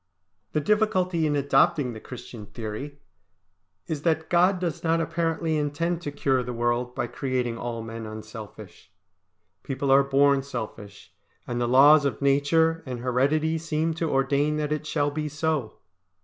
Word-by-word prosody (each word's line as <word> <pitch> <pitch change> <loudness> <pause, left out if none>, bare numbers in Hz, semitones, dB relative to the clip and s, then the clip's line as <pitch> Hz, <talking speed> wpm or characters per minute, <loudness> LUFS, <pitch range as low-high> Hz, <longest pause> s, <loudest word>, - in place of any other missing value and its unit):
The 150 - +1
difficulty 185 -3 +1
in 145 - 0
adopting 135 -2 +2
the 110 - -8
Christian 115 -3 -10
theory 120 +7 -6 0.9
is 155 -3 -4
that 160 0 0
God 180 +2 +4
does 175 -4 -3
not 165 0 +2
apparently 165 -1 -1
intend 160 +4 -1
to 145 - -4
cure 135 -2 +1
the 125 0 -5
world 120 +1 -1
by 120 - -1
creating 125 -2 -2
all 115 -2 -4
men 115 0 -7
unselfish. 110 -3 -10 0.7
People 135 0 -2
are 135 +1 +7
born 140 0 +3
selfish, 105 -6 -8 0.3
and 120 0 -3
the 120 - +1
laws 145 +4 +7
of 140 -3 -1
nature 150 +4 +2
and 125 -2 -5
heredity 145 +6 +1
seem 160 0 -1
to 160 0 -2
ordain 140 +2 +1
that 150 -1 -2
it 150 0 -2
shall 145 -2 0
be 150 +1 -3
so. 150 -6 -2
140 Hz, 155 wpm, -25 LUFS, 125-160 Hz, 0.9 s, are